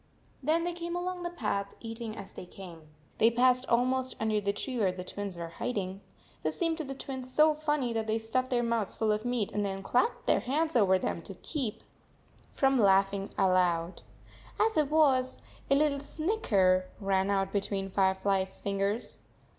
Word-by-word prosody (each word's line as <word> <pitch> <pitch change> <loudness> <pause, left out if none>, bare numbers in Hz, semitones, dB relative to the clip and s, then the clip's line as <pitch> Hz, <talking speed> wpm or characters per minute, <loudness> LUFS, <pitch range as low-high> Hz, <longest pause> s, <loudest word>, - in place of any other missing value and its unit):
48 - - -11
Then 335 +1 +2
they 350 0 -1
came 340 0 -4
along 360 0 -3
the 345 - -2
path, 210 - -3
eating 225 -1 -6
as 195 - -9
they 180 - -9
came. 170 -5 -11 0.3
They 225 - +6
passed 250 +2 +3
almost 255 +2 +1
under 215 -1 +1
the 200 0 +1
tree 250 +4 -4
where 195 -4 +3
the 180 0 -7
Twins 200 -1 -6
were 170 -1 -5
hiding. 195 0 -3 0.4
This - - -2
seemed 330 -2 0
to - - -2
the 270 -1 -6
Twins 260 -2 -7
so 305 +3 +5
funny 295 -5 -1
that 225 -1 -2
they 220 +1 +1
stuffed 255 +3 -1
their 240 -1 +1
mouths 230 -4 -1
full 220 -1 +1
of 210 +2 -1
meat 245 -4 -1
and 210 - -1
then 195 -1 -3
clapped 345 - +1
their - - +3
hands 310 +4 -1
over 195 -5 +5
them 175 - -3
to 195 - -9
keep 235 - -4 0.7
from 270 -1 +2
49 - - +2
laughing 195 +1 +2
aloud. 180 -2 +2 0.6
As 440 0 +3
it 300 -3 +2
was, 275 -5 +3 0.3
a 275 - +5
little 285 -1 +2
snicker 210 - +1
ran 195 -1 +1
out 195 -1 +1
between 195 -1 -2
Firefly 190 0 +2
s 190 0 -7
fingers. 200 +3 -2
225 Hz, 190 wpm, -30 LUFS, 195-270 Hz, 0.7 s, They